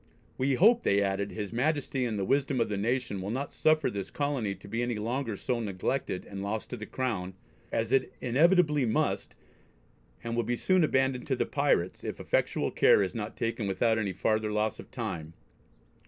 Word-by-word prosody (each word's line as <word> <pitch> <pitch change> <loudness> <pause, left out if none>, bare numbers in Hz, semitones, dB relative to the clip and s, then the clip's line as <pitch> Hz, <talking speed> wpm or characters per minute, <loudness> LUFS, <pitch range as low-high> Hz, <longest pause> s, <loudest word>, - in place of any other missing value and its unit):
We 135 +1 +1
hope," 230 - +5
they 100 - +3
added, 100 +1 -1
"his 105 0 -5
Majesty, 135 0 0
and 110 -3 -2
the 95 - -1
wisdom 135 +2 +1
of 115 - +1
the 105 - -1
nation 115 -1 -1
will 95 - -4
not 130 +5 -3
suffer 155 -1 +3
this 100 -2 -4
colony 135 -9 -1
to 95 - -14
be 115 +4 -2
any 120 -1 -1
longer 115 +2 -2
so 125 +4 -2
neglected 100 0 -2
and 100 -1 -7
lost 105 +2 -3
to - - -2
the 110 - -7
Crown, 100 -8 -3 0.4
as 115 +1 -1
it 135 - +2
inevitably 150 +3 +3
must, 110 - 0 0.9
and 115 0 -3
will 120 - +2
be 120 +2 -1
soon 185 +7 +3
abandoned 130 -3 +1
to - - +1
the - - 0
pirates, - - 0
if - - -5
effectual - - 0
care 100 - +5
is 95 - -3
not 110 -1 -5
taken 115 -2 -2
without 110 +4 +2
any 100 -3 -1
farther 110 +3 0
loss 105 0 0
of - - -10
time. 80 -1 -5
115 Hz, 195 wpm, -29 LUFS, 100-135 Hz, 0.9 s, hope